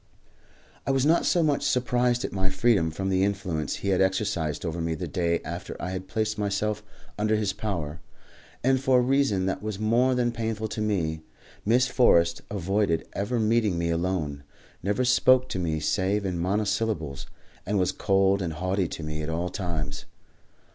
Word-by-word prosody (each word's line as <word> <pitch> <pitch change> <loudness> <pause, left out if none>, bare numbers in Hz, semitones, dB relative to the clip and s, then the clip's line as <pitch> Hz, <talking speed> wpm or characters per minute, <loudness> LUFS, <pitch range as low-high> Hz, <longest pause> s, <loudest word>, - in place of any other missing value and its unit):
I - - 0
was 135 0 +2
not 165 +3 +3
so 175 - +3
much 145 -3 +2
surprised 125 -3 +1
at - - -5
my 95 -1 0
freedom 95 -3 +2
from 95 +4 -3
the 95 0 +2
influence 90 -7 -1
he 100 - -3
had 95 -1 +3
exercised 95 -5 0
over 85 0 -3
me 80 0 -1
the - - -4
day 85 -2 0
after 85 +3 -6
I 90 - -4
had 95 0 -5
placed 110 +1 -1
myself 105 +1 -1 0.4
under 110 +1 +2
his 105 -2 0
power, 90 -8 -4 0.6
and 130 +1 +3
for 130 -1 +4
a - - +5
reason 130 -8 +2
that 95 0 -2
was 105 -1 -4
more 120 +5 +2
than 120 -1 +1
painful 110 -1 -3
to 110 - -4
me. 85 -7 -1 0.4
Miss 120 +4 +4
Forrest 85 -10 +3
avoided 100 -2 0
ever 110 +5 -1
meeting 110 -4 +2
me 85 0 0
alone, 85 -4 -1 0.4
never 105 +7 0
spoke 130 +1 +4
to 95 - -3
me 80 -3 -1
save 100 +5 0
in 90 -2 -2
monosyllables, 100 -6 -1 0.4
and 105 +2 -1
was 90 -2 +2
cold 95 0 +2
and 85 -3 -2
haughty 90 +3 -1
to 80 - -7
me 75 0 -4
at 75 - -4
all 85 +2 -1
times. 80 -6 -4
100 Hz, 180 wpm, -26 LUFS, 85-110 Hz, 0.6 s, a